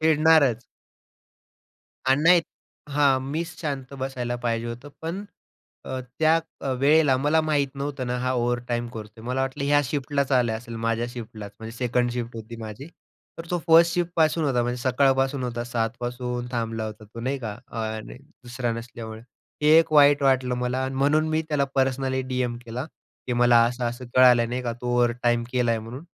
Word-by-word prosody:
खेळणारच. 155 -6 +4 1.4
आणि 135 +3 +3
नाही. 175 +1 +7 0.5
हां, 140 -2 +3
मीच 165 +2 -4
शांत 140 -4 -4
बसायला 125 -2 -3
पाहिजे 115 0 -1
होतं. 120 +5 -7
पण 180 +5 -4 0.6
अ, 130 - -4 0.2
त्या 160 +1 +4 0.4
वेळेला 145 -1 +4
मला 150 +4 +2
माहीत 145 -3 +1
नव्हतं 140 -2 -4
ना, 125 0 -1
हा 130 +1 0
ओव्हरटाईम 120 0 -1
करतोय. 110 0 -9
मला 130 +2 -1
वाटलं 135 +2 -2
ह्या 145 +1 +4
शिफ्टलाच 140 +1 -1
आला 120 -3 +3
असेल, 115 +1 -7
माझ्या 115 +1 -1
शिफ्टलाच. 110 -4 -8
म्हणजे 115 +1 -8
सेकंड 120 0 0
शिफ्ट 120 -1 -4
होती 115 +1 -8
माझी. 110 +6 -7 0.5
तर 165 - -7
तो 175 - +1
फर्स्ट 165 +1 +6
शिफ्टपासून 170 -2 +1
होता. 125 -4 +1
म्हणजे 120 +1 -2
सकाळपासून 135 +1 +2
होता. 120 -1 -3
7:00 115 -2 -1
पासून 125 0 -3
थांबला 115 -2 -2
होता 110 0 -9
तो, 115 +3 -10
नाही 130 +3 -2
का 105 -2 -4 0.2
आरे! 110 +1 -5 0.3
दुसरा 120 -1 -2
नसल्यामुळे 115 -1 -7 0.4
हे 150 - +4
एक 165 -1 +2
वाईट 145 -1 +6
वाटलं 130 -2 +2
मला 125 +1 -1
आणि 130 - -4
म्हणून 150 +4 +2
मी 155 +1 +1
त्याला 145 -2 +1
पर्सनली 130 0 +1
डीएम 125 -2 -2
केला, 120 +3 -5 0.4
की 125 - -1
मला 120 -1 +5
असं-असं 120 +1 -3
कळालं 125 -2 +6
नाही 125 +1 -3
का, 120 -1 -2
तू 120 +1 -8
ओव्हरटाईम 120 -1 +2
केल 125 -2 +1
आहे 115 -1 +2
म्हणून. 120 +8 -8
125 Hz, 170 wpm, -25 LUFS, 120-140 Hz, 1.4 s, नाही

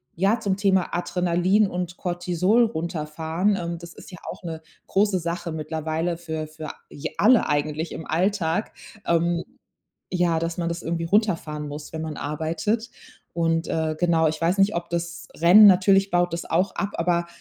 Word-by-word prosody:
ja, 195 +7 +2
zum 195 -3 -1
Thema 190 -3 +2
Adrenalin 180 +3 +2
und 180 -1 -4
Cortisol 180 +5 +1
runterfahren, 165 +1 -1
ähm, 170 -2 -3
das 170 0 -11
ist - - -13
ja 180 - -9
auch - - -12
'ne 160 -2 -6 0.3
große 195 -1 +2
Sache 170 0 -4
mittlerweile 160 +2 -2
für 160 -2 -5
für 155 0 -7 0.2
j 150 +3 -6
alle 235 +3 +5
eigentlich 150 +2 -1
im 160 - -7
Alltag, 180 +2 0 0.3
ähm, 170 0 +1 0.7
ja, 175 -2 +1
dass 165 0 -2
man 170 -1 0
das 170 +1 -4
irgendwie 165 +1 -2
runterfahren 165 -6 0
muss, 145 +1 -8
wenn 160 0 -4
man 155 -1 -5
arbeitet. 165 +10 -2 0.4
Und, 165 0 0
äh, 160 -1 -1
genau, 165 -2 +3
ich 155 0 -4
weiß 170 +4 +1
nicht, 195 +2 +4
ob 170 0 -3
das 170 0 -4
Rennen 180 +6 +8
natürlich 195 +1 +5
baut 175 -1 +2
das 170 - -3
auch 180 +4 +1
ab, 200 - -1
aber, 170 0 0
170 Hz, 170 wpm, -24 LUFS, 160-185 Hz, 0.7 s, Rennen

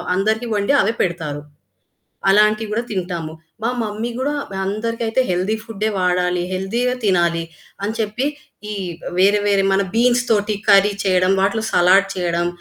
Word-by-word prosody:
అందరికీ 220 +5 0
వండి 205 +7 +1
అవే 220 +4 +1
పెడతారు. 160 -5 -2 0.9
అలాంటివి 215 +1 +3
కూడా 235 +3 0
తింటాము, 175 -5 -4 0.3
మా 230 - +1
మమ్మీ 215 +2 -3
గూడా 270 +3 -1 0.3
అందరికైతే 225 +4 -1
హెల్తీ 185 +4 0
ఫుడే 220 -1 -3
వాడాలి, 180 -1 +1
హెల్తీయే 230 +7 -1
తినాలి. 170 -3 +2 0.4
అని 210 +2 -2
చెప్పి 220 +5 -1 0.4
ఈ - - -3 0.5
వేరే 200 +2 +5
వేరే 200 -1 +3
మన 195 +1 +3
బీన్స్ 245 +1 +3
తోటి 210 -1 +2
కర్రీ 200 +1 +6
చేయడం. 185 -1 +3
వాటిలో 215 +3 +1
సలాడ్ 190 +3 +4
చేయడం, 175 -2 -1
200 Hz, 140 wpm, -19 LUFS, 180-220 Hz, 0.9 s, కర్రీ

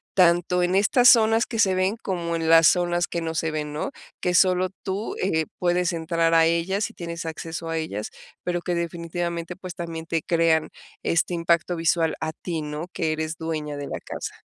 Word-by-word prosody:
tanto 180 0 +4
en 175 +1 +1
estas 245 +5 +5
zonas 225 -1 +5
que 225 -2 -5
se 190 -4 +4
ven 185 +3 +1
como 170 -3 -2
en 165 -1 -1
las 165 -1 +7
zonas 175 -1 +2
que 170 - -3
no 165 0 -3
se 160 -1 0
ven, 150 -1 -3
¿no?, 155 - -3 0.3
que 180 - 0
solo 185 0 +4
tú, 200 +3 -3
eh, 160 -4 +1
puedes 180 0 +1
entrar 165 0 0
a 165 0 +6
ellas 170 +5 0
y - - -16
tienes 170 0 -6
acceso 165 +1 -5
a 165 - -1
ellas, 105 -10 -4 0.3
pero 175 -1 -1
que 180 - -2
definitivamente, 170 0 -3
pues 185 -1 -8
también 165 -2 -6
te 165 -2 -1
crean 165 -2 +2 0.3
este 170 +1 +1
impacto 170 +1 +1
visual 165 0 +1
a 155 - -3
ti, 165 -2 -4
¿no?, 150 +3 -5
que 160 -1 -1
eres 155 +1 -3
dueña 155 -3 -4
de 145 - -5
la - - -4
casa. - - -7
170 Hz, 200 wpm, -24 LUFS, 160-180 Hz, 0.3 s, las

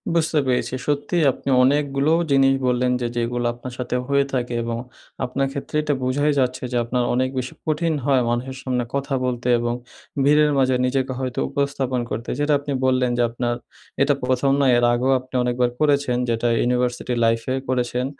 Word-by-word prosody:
বুঝতে 160 -2 +2
পেরেছি। 125 0 0
সত্যিই 145 +3 0
আপনি 135 - -6
অনেকগুলোও 145 +3 +2
জিনিস 135 0 +5
বললেন 125 0 +1
যে, 120 - 0
যেগুলো 120 +1 -1
আপনার 120 +1 -9
সাথে 125 0 -3
হয়ে 140 0 +2
থাকে 125 -2 -1
এবং 115 0 -3 0.5
আপনার 135 +2 -1
ক্ষেত্রে 140 +2 -6
এটা 150 -1 0
বোঝাই 145 +4 +1
যাচ্ছে 130 0 0
যে 125 - 0
আপনার 120 +1 -1
অনেক 130 +1 +1
বেশি 125 0 -3
কঠিন 160 +1 0
হয় 135 -3 +3
মানুষের 125 +3 -2
সামনে 125 -2 -1
কথা 140 0 -2
বলতে 125 -1 -2
এবং 120 0 -1 0.5
ভিড়ের 150 +1 +4
মাঝে 130 -1 +3
নিজেকে 130 0 0
হয়তো 130 -2 -3
উপস্থাপন 140 -3 -1
করতে। 115 - -4
যেটা 145 +1 +2
আপনি 145 0 -6
বললেন 130 -1 +2
যে - - +2
আপনার 120 +1 -2 0.5
এটা 140 +1 +4
প্রথম 130 +2 +1
নয়। 130 -3 +4
এর 120 - +3
আগেও 130 +3 +1
আপনি 130 +1 -18
অনেকবার 125 0 +1
করেছেন 140 -4 +2
যেটা 115 +1 0
ইউনিভার্সিটি 125 0 0
লাইফে 115 +3 0
করেছেন। 125 0 -1
130 Hz, 175 wpm, -22 LUFS, 125-140 Hz, 0.5 s, জিনিস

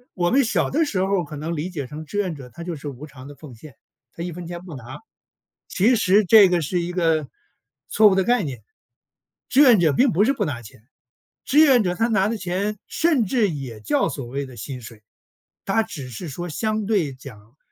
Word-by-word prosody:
我 175 -1 0
们 275 +2 +4
小 230 - 0
的 320 +3 +2
时 255 -10 -4
候 195 -2 0
可 150 0 -9
能 165 +3 -4
理 160 +4 -3
解 155 -7 -5
成 150 +3 -8
志 205 - -6
愿 185 -4 -1
者， 135 -3 -11
他 170 +7 -10
就 175 -1 -5
是 145 0 -8
无 135 +2 -9
偿 135 -2 -13
的 145 - -11
奉 140 -2 -12
献， 130 +3 -14 0.4
他 170 - -7
一 175 - -4
分 175 +1 -8
钱 175 0 -6
不 170 -5 -9
拿， 120 -2 -9 0.7
其 225 +6 +3
实 210 -1 +3
这 205 -1 +8
个 175 -1 +2
是 175 +4 -1
一 175 +1 -4
个 165 -4 +1 0.6
错 215 -1 +5
误 195 - +2
的 190 - +2
概 245 -1 +2
念。 125 -7 -6 0.9
志 275 - +4
愿 245 -7 +7
者 160 -4 +3
并 255 - +3
不 195 +5 +3
是 265 - +3
不 275 - -2
拿 130 -6 -4
钱， 105 0 -15 0.6
志 295 - +3
愿 270 -7 +6
者， 180 -2 0
他 230 - +1
拿 210 -3 +1
的 225 - -2
钱 195 +3 -3
甚 310 -9 +1
至 215 0 +1
也 130 -9 -7
叫 105 - +1
所 140 - -6
谓 140 +3 -4
的 130 - -12
薪 125 +4 -7
水。 110 -1 -13 0.6
他 220 +3 +1
只 140 -12 -8
是 140 +8 -7
说 175 +6 -6
相 215 +6 -2
对 195 -9 0
讲， 125 -2 -14
175 Hz, 245 characters per minute, -22 LUFS, 140-210 Hz, 0.9 s, 这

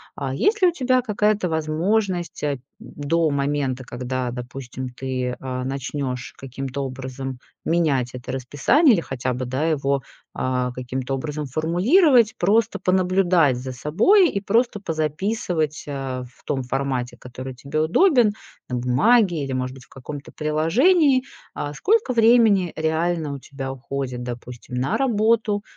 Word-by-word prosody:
А, 135 -1 -3
есть 425 - +1
ли 365 - +7
у - - +4
тебя 255 -5 +2
какая-то 210 -4 +1
возможность, 175 +4 -1
а, 145 -2 0 0.2
до 155 +2 -1
момента, 140 -2 -1
когда, 125 0 -3
допустим, 125 +1 -6
ты, 125 0 -3
э, 125 -1 -4
начнёшь 135 -1 -4
каким-то 135 +1 -5
образом 130 0 -6 0.3
менять 145 -8 +1
это 125 +1 -6
расписание 145 - +3
или 180 - +2
хотя 130 -2 -3
бы, 125 +1 -3
да, 130 +5 -2
его, 140 -2 0 0.3
а, 125 -1 -1
каким-то 130 +1 -4
образом 150 +2 -4
формулировать, 215 - +3
просто 215 +4 +2
понаблюдать 185 -5 +3
за 130 +1 -5
собой? 170 - +4
И 200 - -2
просто 220 0 +1
позаписывать, 160 0 -2
э, 135 -3 -4
в - - -27
том 135 -2 -2
формате, 130 -1 -2
который 130 +1 -8
тебе 140 +4 -3
удобен, 235 - +4 0.4
на 125 - -2
бумаге 155 - +3
или, 135 - -4
может 130 0 -2
быть, 130 - -14
в - - -33
каком-то 140 +2 -9
приложении, 255 - +3 0.3
а, 145 0 -4
сколько 425 - +2
времени 225 -6 +4
реально 160 -1 0
у 140 - -6
тебя 135 0 -6
уходит, 130 -1 -5
допустим, 120 +1 -7
на 130 +3 0
работу, 220 -4 +2
145 Hz, 140 wpm, -23 LUFS, 130-200 Hz, 0.4 s, ли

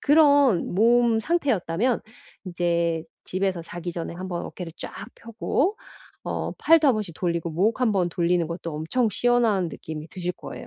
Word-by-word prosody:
그런 285 - +4
몸 230 +2 +4
상태였다면 245 - 0 0.5
이제 170 -2 0 0.2
집에서 185 -2 -1
자기 175 +1 -6
전에 170 0 -5
한번 180 -1 -4
어깨를 175 -3 -7
쫙 - - -7 0.2
펴고 270 - -1 0.5
어 - - -3
팔도 325 -1 +5
한번씩 210 -9 0
돌리고 170 -1 -1
목 205 +10 +1
한번 200 -7 +2
돌리는 170 -1 +1
것도 170 -2 -5
엄청 220 +11 0
시원한 225 -5 +2
느낌이 155 0 -8
드실 180 +1 -4
거예요. - - -9
185 Hz, 310 characters per minute, -25 LUFS, 170-240 Hz, 0.5 s, 팔도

